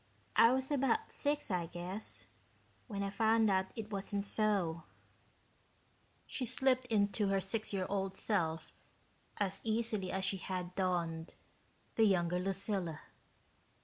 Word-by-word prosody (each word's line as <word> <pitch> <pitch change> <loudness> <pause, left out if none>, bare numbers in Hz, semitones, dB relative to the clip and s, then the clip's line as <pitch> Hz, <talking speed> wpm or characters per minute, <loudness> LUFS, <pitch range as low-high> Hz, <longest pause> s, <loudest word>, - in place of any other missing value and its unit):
I 230 - +7
was 265 +2 0
about 290 - +1
six, 290 -5 -1
I 175 -2 0
guess, 180 +5 -5 0.6
when 200 -4 -3
I 195 - -2
found 220 0 +3
out 190 0 +2
it 220 -1 -6
wasn't 200 0 -1
so." 200 -6 +2 1.4
She 265 - -3
slipped 255 +1 +2
into 205 -2 +2
her 195 0 +2
six 215 +3 -2
year 190 -2 -1
old 195 -1 -1
self 165 -6 -1 0.6
as 195 -1 -1
easily 220 -4 0
as 190 0 -1
she 195 - +1
had 180 -1 -4
donned 170 -3 -1 0.6
the 225 - +4
younger 180 -3 +2
Lucilla. 190 -3 -2
200 Hz, 130 wpm, -35 LUFS, 185-220 Hz, 1.4 s, I